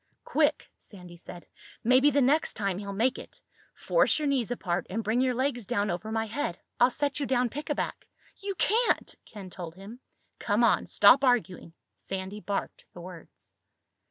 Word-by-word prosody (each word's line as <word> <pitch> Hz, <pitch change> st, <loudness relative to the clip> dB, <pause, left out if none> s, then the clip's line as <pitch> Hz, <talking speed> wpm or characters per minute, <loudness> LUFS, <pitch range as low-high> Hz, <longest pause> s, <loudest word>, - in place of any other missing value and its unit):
"Quick!" -, -, +1 dB
Sandy 180 Hz, -4 st, -13 dB
said. 175 Hz, 0 st, -11 dB, 0.4 s
"Maybe 255 Hz, +5 st, +5 dB
the 285 Hz, -1 st, +2 dB
next 295 Hz, +5 st, +2 dB
time 195 Hz, -3 st, -2 dB
he'll 200 Hz, -1 st, -6 dB
make 235 Hz, +6 st, 0 dB
it. -, -, -12 dB, 0.4 s
Force -, -, +2 dB
your 305 Hz, -1 st, -1 dB
knees 265 Hz, -5 st, 0 dB
apart 180 Hz, -7 st, -2 dB
and 225 Hz, +4 st, -3 dB
bring 225 Hz, +4 st, +1 dB
your 255 Hz, -1 st, +1 dB
legs 250 Hz, -4 st, -1 dB
down 205 Hz, -1 st, 0 dB
over 200 Hz, +5 st, -5 dB
my 225 Hz, 0 st, -1 dB
head. 220 Hz, -5 st, -3 dB, 0.2 s
I'll 245 Hz, +1 st, +6 dB
set 285 Hz, +2 st, -1 dB
you 280 Hz, -, -2 dB
down 250 Hz, -2 st, +1 dB
pickaback." 295 Hz, +3 st, -4 dB, 0.3 s
"You 395 Hz, -1 st, -5 dB
can't!" 445 Hz, +8 st, +1 dB
Ken 195 Hz, -4 st, -11 dB
told 170 Hz, -3 st, -8 dB
him. 200 Hz, +6 st, -11 dB, 0.4 s
"Come 210 Hz, +2 st, +1 dB
on. 230 Hz, -, +3 dB
Stop 250 Hz, +7 st, +6 dB
arguing." 210 Hz, -10 st, 0 dB, 0.2 s
Sandy 190 Hz, +2 st, -6 dB
barked 200 Hz, -1 st, -4 dB
the -, -, -11 dB
words. 175 Hz, -2 st, -12 dB
225 Hz, 170 wpm, -28 LUFS, 195-265 Hz, 0.4 s, I'll